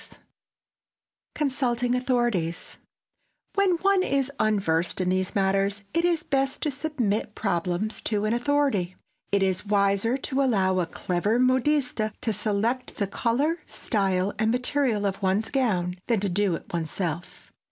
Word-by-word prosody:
[Sidenote: - - -12 1.1
CONSULTING 250 -4 0
AUTHORITIES] 240 -10 -1 0.7
When 395 -2 +3
one 395 -1 +4
is 275 -5 0
unversed 190 -7 +1
in 180 -1 +1
these 185 0 -1
matters 195 +1 +1
it 335 +1 +2
is 340 -2 +1
best 270 -1 0
to 300 - +1
submit 260 -7 -2
problems 180 +2 -1
to 210 -1 0
an 215 - +1
authority. 240 -8 +1 0.4
It 200 -1 +3
is 190 +1 -1
wiser 200 +4 +2
to 275 0 -1
allow 190 -8 +2
a 175 - 0
clever 185 +7 -1
modiste 255 0 +2 0.2
to 225 - -1
select 215 +4 -1
the 200 - 0
color, 265 - 0
style 195 -3 0
and 220 - +2
material 250 -3 +1
of 195 0 -2
one's 200 +3 0
gown 185 -10 0
than 230 -3 +2
to 200 - 0
do 190 -1 +1
it - - -10
one's 165 -2 -2
self. 175 -2 -5
215 Hz, 145 wpm, -26 LUFS, 190-260 Hz, 1.1 s, one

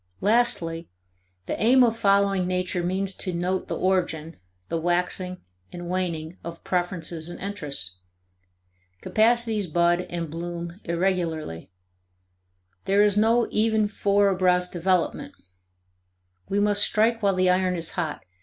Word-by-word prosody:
Lastly, 175 -7 +1 0.6
the - - -2
aim 250 +4 +6
of 230 -2 +2
following 200 -3 +2
nature 180 -1 -1
means 190 +2 -2
to 185 - -1
note 180 +2 -2
the - - -3
origin, 170 -4 -1 0.3
the 165 - -2
waxing, 180 +1 -1 0.3
and 175 0 -7
waning, 175 -2 -3
of 170 0 -8
preferences 175 -2 -3
and 175 - -8
interests. 145 - -3 1.0
Capacities 225 -2 +2
bud 175 +2 +1
and 170 -3 -4
bloom 170 +2 -6
irregularly; 170 - -2 1.2
there 200 +1 +4
is 205 -1 +3
no 225 +3 +3
even 220 -1 +2
four 200 -1 +2
abreast 180 -1 +2
development. 180 0 -1 1.1
We 200 - +1
must 205 0 +3
strike 225 +3 +3
while 200 -2 +2
the 185 0 +3
iron 185 0 +1
is 165 -1 -1
hot. 160 -4 -3
185 Hz, 125 wpm, -25 LUFS, 170-200 Hz, 1.2 s, aim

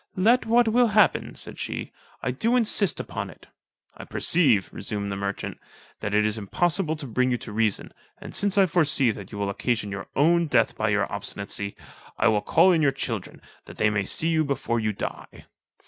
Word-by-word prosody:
"Let 225 +7 +3
what 235 +1 +4
will 240 +2 +4
happen," 210 - +3
said - - -8
she, - - -4 0.3
"I 125 - 0
do 225 - 0
insist 215 -5 +2
upon - - -5
it." - - -15 0.5
"I - - -9
perceive," 130 - +2
resumed 100 -1 -4
the - - -2
merchant, 100 0 -4 0.4
"that 100 - -2
it 105 0 +3
is 105 +1 -1
impossible 160 - 0
to 155 -2 -7
bring 125 +1 0
you 125 - +1
to 115 - -9
reason, 110 -1 -1 0.2
and - - -10
since 205 -1 0
I 195 - +6
foresee 150 -8 +2
that 100 -3 -9
you 105 - -7
will 100 -1 -1
occasion 110 -1 -2
your 100 0 -6
own 170 +4 +3
death 115 -6 +2
by 110 - 0
your 105 0 +2
obstinacy, 100 0 -3 0.4
I 115 - +3
will 105 -1 +2
call 175 - +4
in 165 -3 +3
your 145 - +4
children, 115 -7 -5 0.2
that - - -12
they 105 - +2
may 100 -2 0
see 165 - 0
you 160 -1 +2
before 135 -5 -1
you 110 -1 0
die." 100 - -7
125 Hz, 200 wpm, -25 LUFS, 105-170 Hz, 0.5 s, I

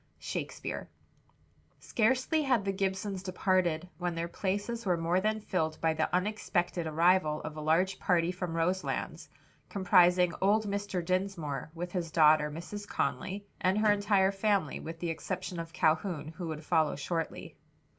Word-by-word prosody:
SHAKESPEARE. - - -5 0.9
Scarcely 260 +7 +1
had 255 -8 +1
the 195 - +1
Gibsons 190 0 -2
departed 185 -3 0
when 175 -1 -2
their 165 0 -2
places 205 +6 -2
were 180 -4 +1
more 170 +3 +1
than 215 +2 0
filled 160 -6 -2
by 160 -1 +2
the 155 0 -1
unexpected 180 -3 0
arrival 160 -1 +3
of 155 - -6
a 155 - -5
large 170 +5 +2
party 175 -1 +2
from 180 -2 -4
Roselands, 180 +3 -2 0.4
comprising 180 -2 +4
old 210 +3 +3
Mr. 200 -3 -2
Dinsmore, 170 -7 -2
with 175 +1 -5
his 175 -3 -2
daughter 155 -1 +5
Mrs. 180 +7 -7
Conly 190 +10 -2
and 185 +2 +2
her 215 0 +4
entire 200 -2 +3
family, 200 -5 0
with 165 +1 -7
the 170 -2 -1
exception 170 +2 -4
of 165 0 -6
Calhoun, 160 0 0
who 170 +1 -6
would 155 0 -5
follow 155 -2 +2
shortly. 165 +3 -4
180 Hz, 150 wpm, -31 LUFS, 165-195 Hz, 0.9 s, daughter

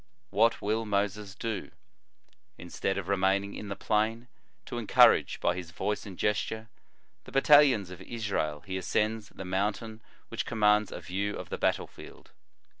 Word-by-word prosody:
What 115 +2 +3
will 110 +2 0
Moses 105 -1 -2
do? 110 -3 -4 0.9
Instead 90 +2 -3
of 95 -2 -4
remaining 100 +1 +1
in 105 - -7
the 100 - -4
plain, 110 +4 0 0.4
to - - -4
encourage, - - +5
by 85 - +1
his 90 -3 -6
voice 105 +5 -3
and 95 -3 -9
gesture, 110 +1 -1 0.6
the - - -12
battalions 135 -8 +5
of 90 0 -10
Israel, 95 -9 -3
he 95 -1 -3
ascends 105 +4 -1
the 95 - -9
mountain 105 +4 -2 0.3
which 115 +2 -2
commands 105 -2 +3
a - - -5
vfew 100 +3 -2
of - - -7
the - - -4
battle - - +1
field. - - -14
105 Hz, 155 wpm, -29 LUFS, 95-110 Hz, 0.9 s, encourage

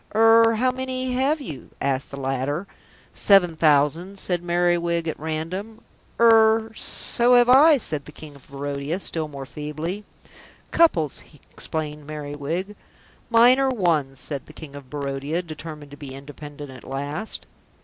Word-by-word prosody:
"Er 225 +1 +6
how 255 +3 +2
many 260 0 -3
have 275 +5 +1
you?" 155 - -8
asked 135 -1 -1
the 140 - -8
latter. 135 +6 -2 0.5
"Seven 180 -5 +4
thousand," 155 +5 +2
said 180 -2 -1
Merriwig 170 -1 +1
at 160 - -3
random. 175 +8 -5 0.4
"Er 225 -1 +5
so 240 +3 0
have 245 0 +6
I," 290 +4 +7
said 150 - -5
the - - -11
King 150 0 -11
of 140 - -18
Barodia, 140 +4 -4
still 160 -5 +1
more 140 -2 -8
feebly. 155 +8 -5 0.7
"Couples," 170 - +3 0.3
explained 150 -2 -5
Merriwig. 155 +6 -4 0.5
"Mine 240 +3 +6
are 270 -1 +2
ones," 160 - 0
said 140 -4 -5
the 155 - -13
King 155 -2 -10
of 140 -3 -11
Barodia, 145 +3 -3
determined 155 -3 -9
to 145 - -11
be 135 -2 -8
independent 145 0 -10
at 130 -2 -12
last. 145 +10 -5
160 Hz, 145 wpm, -23 LUFS, 145-220 Hz, 0.7 s, I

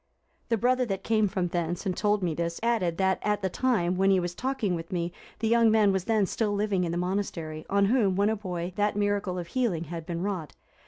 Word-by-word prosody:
The 230 - +2
brother 255 +3 +2
that 195 -2 -3
came 215 -2 +2
from 185 -2 -1
thence, 175 +2 -2
and 185 -2 -1
told 210 0 +1
me 170 -3 0
this, 170 +1 -3
added, 190 -8 +1
that 190 -1 +2
at 210 -1 0
the 190 - 0
time 185 -9 +1
when 195 +1 +3
he 190 -1 +4
was 175 0 -3
talking 255 -4 -1
with 165 -1 -5
me, 175 -1 -2 0.2
the 225 - -1
young 230 0 +5
man 215 -2 +4
was 190 -1 -1
then 220 -3 +2
still 210 +2 -1
living 200 -2 0
in 170 - -1
the 170 - -2
monastery, 175 -4 -3
on 200 0 +3
whom, 205 -4 +2
when 200 +2 +3
a - - 0
boy, 180 -3 -4
that 205 0 +1
miracle 205 -2 0
of 175 - -3
healing 220 -10 0
had 165 0 -7
been 170 0 -3
wrought. 180 -9 -3
195 Hz, 235 wpm, -27 LUFS, 175-210 Hz, 0.2 s, young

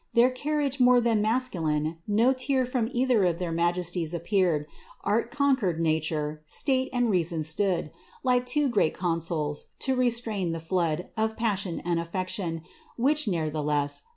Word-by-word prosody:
Their 240 +2 +5
carriage 285 +1 -1
more 250 0 +6
than 230 -3 +2
masculine; 170 -10 0
no 225 +5 +3
tear 260 0 0
From 245 -2 -1
either 245 -4 +2
of 175 -2 +1
their 175 -2 -3
majesties 175 0 0
appear; 170 -4 +1 0.4
Art 220 +3 +1
conquered 260 - +1
nature, 155 -1 -1
state 260 - 0
and 245 -2 +1
reason 170 -3 0
stood, 170 +1 0 0.3
Like 250 -1 +2
two 290 +3 +1
great 210 -10 +1
consuls, 165 -4 -2
to 265 -1 +1
restrain 235 -8 0
the 165 - -4
flood 165 0 -1
Of 220 0 -1
passion 200 -6 -1
and 170 -1 0
afiection, 170 -1 -3 0.3
which, 290 +4 +2
nevertheless. 150 -4 -1
190 Hz, 145 wpm, -27 LUFS, 165-245 Hz, 0.4 s, more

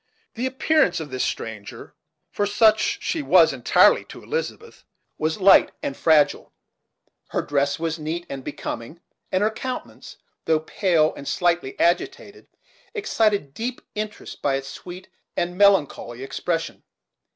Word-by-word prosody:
The 245 +3 -2
appearance 260 - +2
of 150 -4 -7
this 130 -1 -1
stranger, 110 -2 -6 0.4
for 205 - 0
such 215 +1 +3
she 325 - -1
was, - - +5
entirely, - - +4
to - - -12
Elizabeth, 465 0 -5 0.4
was 160 +5 -1
light 195 0 +6
and 135 - -3
fragile. 155 -2 +3 0.8
Her - - -1
dress 140 -1 0
was 165 0 -3
neat 165 +3 -4
and 135 -1 -7
becoming; 145 +1 -6 0.3
and 185 +2 +1
her 215 - +2
countenance, 255 +3 -7 0.3
though 160 -1 +2
pale 165 -2 +1
and 140 - -10
slightly 175 -6 0
agitated, 180 - -1 0.5
excited 210 - 0
deep 245 - -4
interest 215 0 -6
by 140 -1 +1
its 135 0 -4
sweet 180 +4 -10 0.3
and 175 0 -1
melancholy 160 -11 +2
expression. 165 +5 -3
175 Hz, 135 wpm, -23 LUFS, 145-215 Hz, 0.8 s, light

